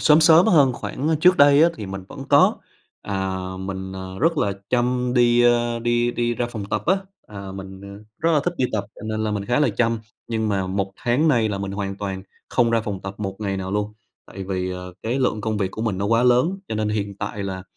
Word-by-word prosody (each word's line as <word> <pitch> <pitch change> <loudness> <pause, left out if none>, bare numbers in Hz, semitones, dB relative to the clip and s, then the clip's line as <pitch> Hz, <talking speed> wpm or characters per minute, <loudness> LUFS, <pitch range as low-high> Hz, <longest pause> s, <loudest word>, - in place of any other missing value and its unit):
sớm 150 +1 +6
sớm 165 +4 +7
hơn 145 -10 +5
khoảng 135 +4 -4
trước 180 +2 +6
đây 145 +1 +6
á 170 - +6
thì 105 - -6
mình 95 0 -6
vẫn - - -8
có. - - +5 0.5
À, 95 -2 -2 0.2
mình, 95 0 -5
à, - - -6 0.2
rất 165 +2 +2
là 100 -6 +1 0.2
chăm 125 0 +1
đi, 120 -1 +4
ơ, 120 -1 +2
đi 120 +1 +1
đi 120 0 -1
ra 120 - -1
phòng 110 -4 -6
tập 105 +1 -2
á. 190 +4 +4 0.3
À, 100 -2 -8
mình, 95 0 -9
à, 100 - -9 0.2
rất 165 - +1
là 150 - +4
thích 175 - -1
đi 130 - +1
tập 100 -2 -1
cho - - -13
nên 110 0 -2
là 110 - -1
mình 100 -1 -2
khá 120 +7 +1
là 150 - +4
chăm. 115 -1 +1 0.3
Nhưng 110 -1 -1
mà 95 -2 0
1 95 +1 -2
tháng 130 +7 +1
nay 115 -6 +3
là 100 -2 -3
mình 100 0 -4
hoàn 100 -1 -4
toàn 95 -2 -4 0.3
không 120 -2 +2
ra 115 0 +2
phòng 105 -3 -5
tập 95 0 -6
một 95 -2 -4
ngày 100 -2 -2
nào 95 0 -4
luôn. 105 +1 -1 0.3
Tại 95 0 -8
vì, 95 -1 -2
ờ, 90 0 -7
cái 120 +4 -1
lượng 115 -5 0
công 110 0 -2
việc 95 -2 -1
của 110 - -5
mình 105 -5 -1
nó 100 - -1
quá 115 +2 +3
lớn, 125 +10 +3
cho - - -3
nên 110 0 -1
hiện 100 -2 -2
tại 105 - -4
là 95 -1 -4
110 Hz, 250 wpm, -22 LUFS, 100-125 Hz, 0.5 s, sớm